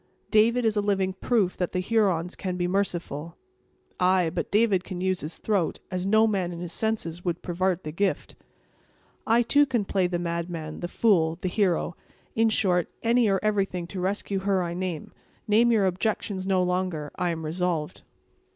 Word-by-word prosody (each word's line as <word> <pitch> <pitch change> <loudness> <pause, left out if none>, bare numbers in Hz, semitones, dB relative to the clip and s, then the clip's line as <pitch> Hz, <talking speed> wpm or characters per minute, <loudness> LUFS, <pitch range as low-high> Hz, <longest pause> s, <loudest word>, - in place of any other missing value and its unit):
"David 235 +3 +4
is 220 -1 +2
a 205 - +2
living 195 -2 0
proof 195 -1 +1
that 180 - -2
the 185 - 0
Hurons 185 -4 +1
can 185 -2 -4
be 175 0 0
merciful." 175 -4 -2 0.6
"Ay, 180 -2 +3
but - - -3
David 205 -4 +3
can 185 -2 -6
use 185 0 0
his 155 - -6
throat, 200 -6 0
as 185 0 -2
no 220 +2 +5
man 195 -5 0
in 170 - -7
his 175 -1 -5
senses 180 -6 -2
would 175 -1 -2
pervart 185 0 -1
the 155 - -5
gift." 195 +5 -1 0.9
"I 235 +2 +4
too 285 +4 +4
can 240 -6 0
play 190 -2 +1
the 175 -1 -2
madman, 170 -2 -4
the 175 - -3
fool, 170 -6 +2
the 185 - -1
hero; 180 -3 0 0.4
in 225 0 +3
short, 180 -5 +2
any 235 0 +3
or 195 -1 +2
everything 195 -4 0
to 190 - -5
rescue 195 +1 -1
her 190 -1 +1
I 170 -1 -3
love. 180 -3 -4 0.4
Name 225 +3 +4
your 215 -4 +3
objections 190 0 -1
no 190 -2 +3
longer: 180 -5 -2
I 180 - +1
am 165 -1 -3
resolved." 165 -1 -2
185 Hz, 180 wpm, -26 LUFS, 175-205 Hz, 0.9 s, no